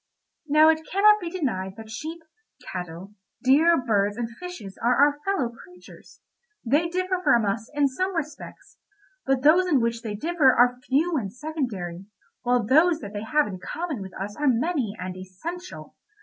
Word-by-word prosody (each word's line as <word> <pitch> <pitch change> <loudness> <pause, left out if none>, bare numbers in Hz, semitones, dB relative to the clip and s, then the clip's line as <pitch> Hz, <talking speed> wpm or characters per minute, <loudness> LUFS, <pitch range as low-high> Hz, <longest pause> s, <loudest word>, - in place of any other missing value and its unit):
"Now 305 +2 +6
it 320 0 +2
cannot 420 +2 +5
be 350 -4 -5
denied 220 - -3
that 220 -1 -10
sheep, 320 +8 -6 0.5
cattle, 180 +2 -7 0.3
deer, 310 +6 +5
birds, 205 -4 0
and 240 -1 -2
fishes 295 - -9
are 240 +2 +3
our 290 +2 +3
fellow 385 -12 0
creatures. 360 +10 -16 0.4
They 295 +8 +2
differ 370 +1 -1
from 235 -9 +4
us 220 +3 -2
in 290 -1 +3
some 370 +8 -2
respects, 310 -2 -7 0.5
but 265 -1 +1
those 345 +5 +5
in 295 -7 +3
which 230 0 -1
they 220 -3 -5
differ 300 +1 +3
are 245 +1 +4
few 315 +5 +2
and 200 -7 -3
secondary, 215 - -5 0.3
while 245 -2 +1
those 315 +8 +4
that 205 0 -8
they 205 - -4
have 300 +7 +2
in 190 -3 -7
common 320 - -4
with 190 -1 -9
us 205 +2 -5
are 295 - 0
many 255 - 0
and 180 0 -5
essential. 320 - -8
265 Hz, 170 wpm, -25 LUFS, 210-330 Hz, 0.5 s, Now